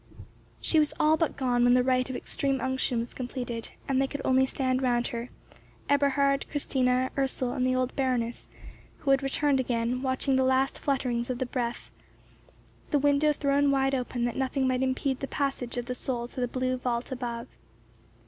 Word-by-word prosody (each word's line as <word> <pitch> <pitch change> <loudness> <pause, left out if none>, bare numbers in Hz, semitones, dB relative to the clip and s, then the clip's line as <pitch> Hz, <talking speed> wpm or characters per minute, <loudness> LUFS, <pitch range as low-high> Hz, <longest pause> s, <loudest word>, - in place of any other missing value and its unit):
She 320 - +2
was 300 -1 +1
all 310 +1 +5
but 320 0 -1
gone 245 -2 +2
when 245 0 +6
the 250 - +4
rite 255 0 +1
of 260 - -4
extreme 275 +1 -1
unction 260 -1 0
was 230 +1 -3
completed, 245 -2 -5 0.2
and 270 -1 +2
they 270 - +2
could 285 - -5
only 260 0 +4
stand 260 -1 0
round 240 -2 +1
her, 235 +1 -5 0.6
Eberhard, 280 -1 +2
Christina, 255 -3 +1
Ursel, 265 -2 -1
and 250 - -1
the 255 0 +2
old 255 0 -1
Baroness, 250 -3 -1 0.5
who 275 - 0
had 270 0 +4
returned 275 0 +1
again, 245 0 -1
watching 260 0 +1
the 265 - +3
last 260 +1 +2
flutterings 250 -4 -1
of 250 - -1
the 260 - -1
breath, 245 -1 -4 1.0
the 295 - +3
window 290 +1 +3
thrown 285 -1 +2
wide 270 0 +2
open 250 -2 -1
that 240 - -2
nothing 265 0 0
might 255 0 +1
impede 265 0 0
the 275 - -4
passage 270 -4 -2
of 245 - -2
the 250 - -3
soul 245 -1 -3
to 255 - -5
the 245 - +1
blue 255 +1 -1
vault 245 0 -2
above. 240 -2 -4
260 Hz, 185 wpm, -28 LUFS, 245-275 Hz, 1.0 s, when